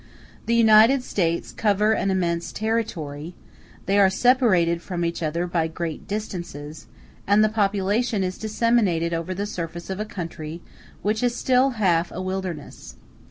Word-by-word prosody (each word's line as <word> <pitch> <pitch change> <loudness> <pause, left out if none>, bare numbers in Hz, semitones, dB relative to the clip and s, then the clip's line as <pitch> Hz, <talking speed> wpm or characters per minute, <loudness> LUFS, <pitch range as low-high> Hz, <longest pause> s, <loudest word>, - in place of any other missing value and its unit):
*a - - -24
The 235 - +2
United 230 +3 +6
States 170 -7 -1
cover 210 0 +2
an 195 -2 +1
immense 170 -3 -1
territory; 175 -9 -3 0.5
they 200 +1 +2
are 195 -1 +6
separated 190 -7 +3
from 175 -1 -3
each 170 +1 -3
other 165 +2 -1
by 170 -2 0
great 165 -1 -5
distances; 170 -8 -6 0.4
and 205 +2 +5
the 215 - +3
population 205 +1 0
is 185 0 -3
disseminated 215 -7 +1
over 165 +3 -3
the 200 +2 -2
surface 170 -2 -6
of 190 - -4
a 215 - -2
country 170 -4 -7 0.4
which 215 +2 0
is 245 -1 +1
still 260 +1 +2
half 175 -4 +2
a - - -6
wilderness. 185 -4 -5
190 Hz, 155 wpm, -23 LUFS, 170-215 Hz, 0.5 s, United